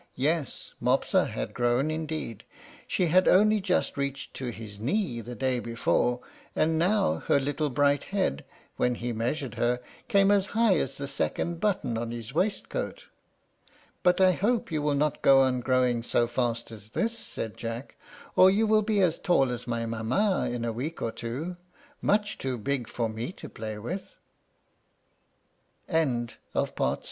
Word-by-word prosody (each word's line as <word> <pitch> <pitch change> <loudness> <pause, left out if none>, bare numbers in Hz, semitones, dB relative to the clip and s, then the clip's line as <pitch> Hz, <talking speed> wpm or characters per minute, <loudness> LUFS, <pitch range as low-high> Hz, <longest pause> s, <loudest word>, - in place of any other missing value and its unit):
Yes, 150 +2 -1
Mopsa - - +2
had - - -4
grown 125 +5 +1
indeed; 155 -8 -4 0.4
she 180 - +1
had 180 +3 +4
only 215 +2 +5
just 185 -3 0
reached 140 0 -3
to 130 - -6
his 110 -4 -7
knee 130 - -1
the 120 +2 -8
day 130 -1 0
before, 120 +1 0 0.3
and 160 +1 +2
now 170 - +2
her 140 - +4
little 145 +2 -1
bright 145 +2 +2
head, 195 - -1 0.3
when 125 0 +2
he 120 0 -3
measured 120 +3 -2
her, 120 +1 +2 0.3
came 200 -3 +4
as 200 -1 +3
high 225 -4 +5
as 135 -2 -1
the 140 - -4
second 165 +4 -2
button 145 - 0
of 115 0 -3
his 120 +1 -6
waistcoat. 205 - -2 0.9
"But 180 0 +3
I 185 -1 +6
hope 215 +3 0
you 155 -2 0
will 145 -1 +1
not 150 +1 0
go 135 0 +7
on 130 -1 +2
growing 125 -1 +2
so 120 0 +2
fast 120 -1 -2
as 105 -1 -11
this," 230 - -1
said 110 - -5
Jack, 115 +3 -6 0.4
"or 185 - +8
you 210 +4 +3
will 215 0 +4
be 210 -1 +1
as 170 -3 +2
tall 135 -8 +3
as 125 0 -5
my 115 -1 -1
mamma 120 - 0
is 120 - -3
in 120 -1 -3
a 115 - -1
week 145 +8 -4
or 115 - -1
two, 135 +12 -5 0.4
much 205 0 +1
too 130 -2 -2
big 125 +2 -2
for 115 -2 -1
me 110 +6 -4
to - - -10
play 110 -1 -6
with." 170 - -6 1.7
CHAPTER 160 - -4
X. 160 -3 +4
MOPSA 120 -2 -4 0.2
LEARNS - - +1
HER - - +1
LET - - 0
135 Hz, 175 wpm, -28 LUFS, 120-180 Hz, 1.7 s, or